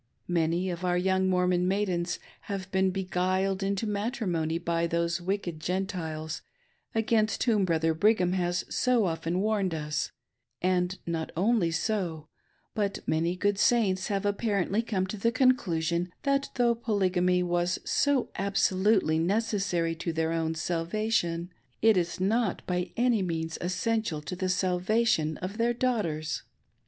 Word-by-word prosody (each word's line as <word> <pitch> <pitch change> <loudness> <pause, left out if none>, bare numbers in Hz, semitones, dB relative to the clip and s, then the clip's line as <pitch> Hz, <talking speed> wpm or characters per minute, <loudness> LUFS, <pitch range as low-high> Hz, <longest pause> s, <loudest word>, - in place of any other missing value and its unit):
Many 175 +1 +1
of 175 +1 -6
our 180 -1 +2
young 190 +1 +2
Mormon 180 -1 +2
maidens 185 -3 0 0.3
have 190 -1 -4
been 190 0 +2
beguiled 185 +1 0
into 195 +2 -1
matrimony 200 -7 -1
by 170 0 0
these 170 +1 0
wicked 180 -3 -2
Gentiles, 165 -3 -3 0.5
against 220 -1 +2
whom 215 -5 +3
Brother 165 -2 +1
Brigham 180 +1 +3
has 175 -1 0
so 250 -4 +2
often 165 +1 -1
warned 200 -5 0
us; 150 -1 -2 0.5
and 180 0 +1
not 165 -1 -3
only 200 -2 +3
so, 165 -3 -2 0.5
but 205 -2 -2
many 165 +3 +1
good 200 +1 0
Saints 200 -6 +3
have 200 -1 -1
apparently 205 0 +1
come 200 -5 -1
to 190 +3 -5
theconclusion 185 - +1
that 275 0 +1
though 240 -2 +3
Polygamy 185 -5 +1
was 175 0 0
so 285 -3 +1
absolutely 195 -3 +2
necessary 190 -3 0
to 165 +1 -2
their 160 0 0
own 165 -1 -1
salvation, 170 +1 -1 0.3
it 220 -1 +6
is 170 -1 -1
not 210 +1 0
by 180 0 -2
any 240 -3 +3
means 165 -2 -3
essential 185 -1 -1
to 150 +5 -5
the 185 0 -2
salvation 180 -2 +1
of 200 +5 -5
their 235 +1 +2
daughters. 185 -12 -1
185 Hz, 135 wpm, -28 LUFS, 170-210 Hz, 0.5 s, it